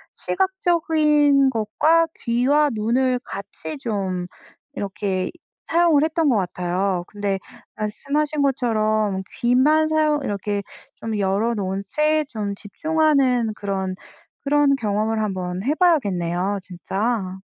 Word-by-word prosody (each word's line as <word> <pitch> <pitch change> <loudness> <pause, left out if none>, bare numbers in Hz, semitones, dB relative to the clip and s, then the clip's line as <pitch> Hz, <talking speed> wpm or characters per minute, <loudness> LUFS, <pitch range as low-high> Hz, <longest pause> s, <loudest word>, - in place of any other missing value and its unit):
시각적인 310 -7 +2
것과 290 +9 +2
귀와 270 +6 +2
눈을 245 +4 +1
같이 200 +9 -7
좀 195 -7 -2 0.5
이렇게 195 -4 -2 0.3
사용을 330 -3 +3
했던 320 0 +1
것 250 - +3
같아요. 180 -1 -1
근데 200 -2 -2 0.4
말씀하신 285 +8 -1
것처럼 215 -7 +1 0.2
귀만 285 +6 +4
사용 310 -1 +2
이렇게 205 -2 -2 0.3
좀 225 -1 -4
열어 200 +4 +1
놓은 195 -2 -3
채 305 +3 +1
좀 210 -5 -4
집중하는 265 0 +1
그런 190 -2 -3 0.5
그런 285 0 +3
경험을 220 -2 -1
한번 185 -2 -3
해 275 +6 +1
봐야겠네요, 200 - +1
진짜. 190 +2 -3
225 Hz, 235 characters per minute, -22 LUFS, 200-295 Hz, 0.5 s, 귀만